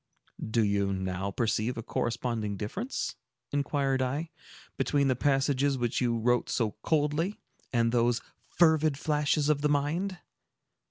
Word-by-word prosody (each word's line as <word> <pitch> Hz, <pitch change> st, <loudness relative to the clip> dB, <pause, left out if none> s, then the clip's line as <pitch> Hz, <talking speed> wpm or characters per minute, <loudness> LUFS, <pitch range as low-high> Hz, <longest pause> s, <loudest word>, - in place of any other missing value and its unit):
"Do 110 Hz, +1 st, +1 dB
you 100 Hz, -1 st, +1 dB
now 95 Hz, 0 st, -2 dB
perceive 115 Hz, +3 st, 0 dB
a 115 Hz, -, -4 dB
corresponding 115 Hz, -3 st, -2 dB
difference," 195 Hz, -, -4 dB, 0.3 s
inquired 140 Hz, -2 st, 0 dB
I, 145 Hz, +6 st, -2 dB, 0.4 s
"between 140 Hz, -2 st, +1 dB
the 130 Hz, -, +3 dB
passages 135 Hz, +1 st, +2 dB
which 120 Hz, 0 st, -1 dB
you 120 Hz, -2 st, +1 dB
wrote 120 Hz, +2 st, +1 dB
so 110 Hz, -4 st, 0 dB
coldly, 155 Hz, -, 0 dB, 0.3 s
and 115 Hz, -2 st, +2 dB
those 120 Hz, 0 st, +2 dB, 0.3 s
fervid 160 Hz, -4 st, +3 dB
flashes 150 Hz, 0 st, +1 dB
of 150 Hz, -1 st, +2 dB
the 150 Hz, -, +2 dB
mind?" 160 Hz, +7 st, 0 dB
135 Hz, 130 wpm, -29 LUFS, 115-150 Hz, 0.4 s, the